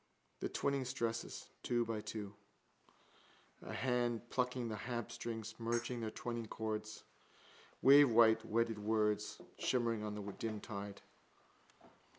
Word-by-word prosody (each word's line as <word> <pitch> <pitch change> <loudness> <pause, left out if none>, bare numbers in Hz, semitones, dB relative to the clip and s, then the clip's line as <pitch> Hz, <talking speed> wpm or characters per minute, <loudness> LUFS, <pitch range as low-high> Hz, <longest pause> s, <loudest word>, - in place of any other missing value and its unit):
The - - -2
twining 140 -1 0
stresses, 115 -2 -2 0.2
two 120 -1 +1
by 110 -2 -2
two. 105 -2 -5 1.3
A - - -7
hand 120 -2 0
plucking 125 -1 0
the 110 - -3
harpstrings, 115 -1 -4
merging 120 +1 -1
their 110 -1 -2
twining 115 +1 -4
chords. 110 0 -4 0.8
Wavewhite 120 -5 +8
wedded 115 0 +1
words 105 0 +1 0.2
shimmering 115 -3 +1
on 105 -1 -3
the 105 - -5
dim 110 0 -3
tide. 100 -2 -6
115 Hz, 115 wpm, -37 LUFS, 110-120 Hz, 1.3 s, Wavewhite